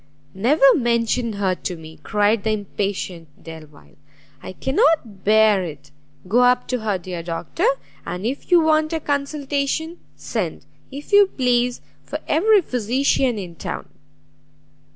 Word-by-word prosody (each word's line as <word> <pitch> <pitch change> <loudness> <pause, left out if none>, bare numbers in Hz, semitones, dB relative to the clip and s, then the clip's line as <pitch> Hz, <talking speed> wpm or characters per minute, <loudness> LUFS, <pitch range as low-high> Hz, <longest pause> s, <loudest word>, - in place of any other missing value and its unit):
"Never 260 +10 +3
mention 235 -1 0
her 200 -2 0
to 180 0 -5
me!" 160 0 -12
cried 210 0 +1
the 220 - 0
impatient 200 -4 -3 0.2
Delvile, 155 - -13 0.4
"I - - -8
cannot 265 - +1
bear 215 -2 +4
it! 155 -4 -9 0.4
Go 225 +6 +3
up 250 0 +3
to 250 0 -1
her, 215 -3 -1
dear 180 -1 -6
Doctor, 170 - -2 0.4
and 180 +3 -5
if 265 +4 -4
you 350 -2 +6
want 310 0 +2
a 325 - 0
consultation, 285 +3 -2 0.2
send, - - -4 0.2
if 285 +8 -9
you 405 -1 +7
please, 245 -5 0 0.2
for - - -5
every 415 +6 +4
physician 250 0 0
in 180 -4 -6
town." - - -6
235 Hz, 135 wpm, -21 LUFS, 190-280 Hz, 0.4 s, you